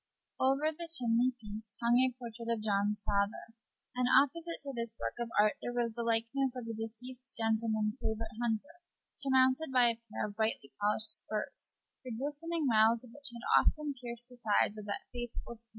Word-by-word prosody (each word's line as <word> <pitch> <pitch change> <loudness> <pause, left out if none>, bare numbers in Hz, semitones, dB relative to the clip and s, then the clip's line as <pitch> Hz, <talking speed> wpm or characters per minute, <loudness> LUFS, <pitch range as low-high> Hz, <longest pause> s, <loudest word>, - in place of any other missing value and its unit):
Over 275 +4 +3
the 335 +1 -7
chimney 245 -3 +3
piece 215 -1 -8
hung 240 +1 +4
a 260 - +4
portrait 235 -1 -6
of 230 -2 0
John's 205 0 +1
father, 200 +2 0 0.4
and 250 0 +2
opposite 330 +6 +3
to 280 -1 -5
this 235 -2 -4
work - - -2
of 235 -1 -2
art 210 0 +4
there 245 - -3
was 235 -2 +1
the 235 - -3
likeness 235 +3 +1
of 245 - -5
the 230 - -4
deceased 245 +4 -6
gentleman's 220 0 +1
favorite 220 0 -2
hunter, 240 +9 -2 0.3
surmounted 265 +2 +3
by 250 -2 +6
a 230 0 -3
pair - - -1
of 205 -1 -6
brightly 220 -11 -1
polished 210 +1 +1
spurs, 215 -1 -4 0.3
the 255 - -7
glistening 295 +7 -2
rowels 225 0 +5
of 245 - -13
which 285 +2 -7
had 240 0 -9 0.2
often 300 -2 +1
pierced 240 0 -7
the 250 - -14
sides 215 -2 +2
of 210 - -8
that 200 -1 -4
faithful 240 -1 -5
steed. 230 0 -9
235 Hz, 185 wpm, -33 LUFS, 220-260 Hz, 0.4 s, by